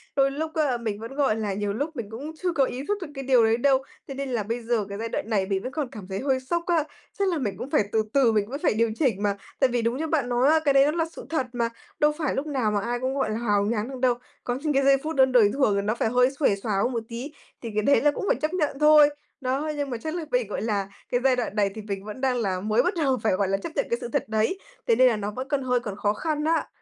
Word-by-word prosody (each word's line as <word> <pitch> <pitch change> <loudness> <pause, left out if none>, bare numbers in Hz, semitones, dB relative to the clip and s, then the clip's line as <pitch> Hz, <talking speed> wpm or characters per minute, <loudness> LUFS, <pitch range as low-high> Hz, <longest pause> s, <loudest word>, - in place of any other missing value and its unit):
đôi 275 0 +3
lúc 315 +3 -4
á, 290 -6 +1
mình 220 -3 -4
vẫn, 230 +4 -8
gọi 275 -7 +2
là, 215 -3 -2
nhiều 205 +1 -2
lúc 290 +8 -3
mình 230 -6 -5
cũng 275 +8 -6
chưa 360 - +2
có 280 -5 +3
ý 255 +1 -5
thức 415 - 0
được 350 - -4
cái 270 - -5
điều 255 -3 +4
đấy 225 +1 +3
đâu, 265 +1 +3 0.2
thế 275 - -6
nên 275 0 -4
là 235 -4 -1
bây 230 +4 -3
giờ 230 -2 0
cái 200 - -5
giai 230 +2 -4
đoạn 220 - -3
này 200 -4 +1
mình 195 0 -1
vẫn 255 - -4
còn 295 -1 -2
cảm 210 -8 -9
thấy 190 0 -4
hơi 265 -1 +1
sốc 335 +7 -2
á, 335 -3 +3 0.4
chắc 395 - +2
là 345 - 0
mình 205 -9 -2
cũng 245 +5 -6
phải 295 -8 +3
từ 220 -1 +2
từ 265 -5 +4
mình 210 -1 0
vẫn 280 +3 -4
phải - - +3
điều 225 +1 +1
chỉnh 225 -9 +1
mà. 200 -1 +1 0.2
Tại 265 - +5
vì 240 -1 0
đúng 230 +2 0
như 320 +3 -2
bạn 295 -6 0
nói 245 +3 +3
á, 320 +1 +5
cái 280 - +4
đấy 275 0 +6
nó 295 - +2
là 330 0 0
sự - - -10
thật 315 -6 -1
mà, 235 -1 0 0.3
đâu 300 0 +4
phải 305 -5 -1
lúc 275 - -2
nào 260 -7 0
mà 205 - +1
ai 240 +3 -2
cũng, 260 +1 -1
gọi 265 -5 0
là, 215 - -2
hào 205 -3 +1
nhoáng 215 0 -1
được 265 -1 -7
đâu, 250 -1 +3 0.3
có 245 - -1
những 295 +3 -1
cái 275 0 +3
giây 275 0 +5
phút 315 +1 -3
đơn 265 -1 +5
đời 235 -5 +6
thường 265 -7 +2
thì 200 - +1
nó 210 +3 -1
phải 225 - 0
hơi 250 +2 +3
xuề 270 -9 +3
xoà 205 +2 -3
hơn 250 - +1
một 230 -2 -2
tí, 245 +5 -6 0.3
thì 230 - -5
cái 215 - +2
đấy 280 - +4
là 295 - +4
cũng 345 - -4
phải - - +3
chấp 310 +3 -1
nhận 300 -6 -1
thôi. 300 -1 +7 0.3
Đó, 270 +4 -1
nhưng 285 -1 -2
mà 245 - -3
chắc 315 +8 -5
là 340 -2 -3
mình, 250 -3 +1
gọi 205 - -4
là, 205 -3 -1 0.2
cái 245 - +1
giai 265 -1 +4
đoạn 240 -4 -3
này 205 -2 +2
thì 220 - -6
mình 200 -2 -5
vẫn 215 +5 -7
đang 260 -2 +1
là 195 -6 -1
mới 215 +4 +2
bắt 360 - +1
đầu 265 -2 +2
phải, 220 - +2
gọi 195 +1 +1
là, 195 +1 +1
chấp 255 +12 -6
nhận 280 - +1
cái 235 - 0
sự - - -4
thật - - -1
đấy, 220 - 0 0.3
thế 230 - +5
nên 255 +2 +6
là 230 - +1
nó 205 0 -3
vẫn 255 +5 -5
còn 285 -1 0
hơi 250 -1 +1
còn 215 -5 -6
khó 205 0 0
khăn 300 +5 -2
á. 325 0 +1
250 Hz, 320 wpm, -25 LUFS, 215-280 Hz, 0.4 s, thôi